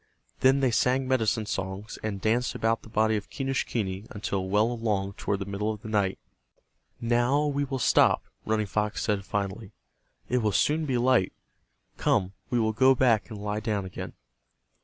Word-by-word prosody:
Then 135 Hz, +1 st, +4 dB
they 130 Hz, -2 st, +3 dB
sang 130 Hz, +4 st, +2 dB
medicine 115 Hz, -4 st, +1 dB
songs, 95 Hz, +1 st, -4 dB
and 105 Hz, -2 st, -3 dB
danced 115 Hz, +5 st, 0 dB
about 115 Hz, +1 st, +1 dB
the -, -, -14 dB
body 110 Hz, 0 st, +2 dB
of 105 Hz, -, -7 dB
Quenischquney 115 Hz, -7 st, -2 dB
until 100 Hz, -2 st, -3 dB
well 105 Hz, +4 st, +3 dB
along 105 Hz, -4 st, -1 dB
toward 100 Hz, -, -2 dB
the 100 Hz, -, -5 dB
middle 100 Hz, +2 st, -2 dB
of 105 Hz, 0 st, -8 dB
the 110 Hz, -, -6 dB
night. 100 Hz, -3 st, +1 dB, 0.8 s
"Now 120 Hz, +5 st, +2 dB
we 145 Hz, -1 st, 0 dB
will 135 Hz, -1 st, -3 dB
stop," -, -, +4 dB, 0.2 s
Running 110 Hz, -1 st, 0 dB
Fox 105 Hz, +1 st, -1 dB
said, 105 Hz, -2 st, 0 dB
finally, 100 Hz, +1 st, -4 dB, 0.5 s
"It 125 Hz, -, +1 dB
will 105 Hz, -3 st, 0 dB
soon 155 Hz, +7 st, +2 dB
be 130 Hz, -3 st, +1 dB
light. 120 Hz, -5 st, +3 dB, 0.6 s
Come, 95 Hz, 0 st, +1 dB, 0.2 s
we 125 Hz, -, +1 dB
will 110 Hz, -1 st, +1 dB
go 130 Hz, +4 st, +5 dB
back 120 Hz, -5 st, +2 dB
and 110 Hz, -3 st, -7 dB
lie 105 Hz, +1 st, -2 dB
down 105 Hz, -3 st, -2 dB
again." 95 Hz, -, -7 dB
110 Hz, 175 wpm, -27 LUFS, 100-125 Hz, 0.8 s, go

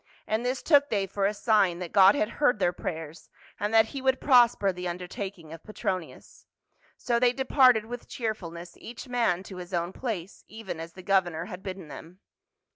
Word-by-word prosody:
And 220 Hz, +2 st, -1 dB
this 250 Hz, +1 st, -2 dB
took 290 Hz, -2 st, +4 dB
they 200 Hz, -3 st, 0 dB
for 195 Hz, +1 st, -1 dB
a 205 Hz, -, -1 dB
sign 205 Hz, -5 st, +2 dB
that 175 Hz, -2 st, -6 dB
God 195 Hz, +2 st, +7 dB
had 315 Hz, +2 st, +1 dB
heard 250 Hz, -6 st, +4 dB
their 180 Hz, -3 st, +1 dB
prayers, 160 Hz, -1 st, -7 dB, 0.3 s
and 205 Hz, +1 st, -1 dB
that 225 Hz, 0 st, +5 dB
he 275 Hz, -, -6 dB
would 265 Hz, 0 st, +2 dB
prosper 240 Hz, -7 st, +4 dB
the 180 Hz, 0 st, -5 dB
undertaking 180 Hz, -1 st, -6 dB
of 165 Hz, -, -11 dB
Petronius. 185 Hz, -5 st, -6 dB, 0.5 s
So 235 Hz, -1 st, 0 dB
they 245 Hz, 0 st, +3 dB
departed 255 Hz, -4 st, +4 dB
with 245 Hz, +1 st, -8 dB
cheerfulness 175 Hz, -7 st, -5 dB
each 240 Hz, +3 st, -9 dB
man 230 Hz, -8 st, 0 dB
to 190 Hz, -1 st, -10 dB
his 180 Hz, 0 st, -6 dB
own 170 Hz, +2 st, -2 dB
place, 205 Hz, -7 st, -5 dB
even 220 Hz, -6 st, -7 dB
as 165 Hz, 0 st, -8 dB
the 185 Hz, -, -12 dB
governor 175 Hz, -4 st, +1 dB
had 185 Hz, -2 st, -8 dB
bidden 190 Hz, -3 st, -7 dB
them. 165 Hz, +5 st, -11 dB
195 Hz, 190 wpm, -27 LUFS, 175-235 Hz, 0.5 s, God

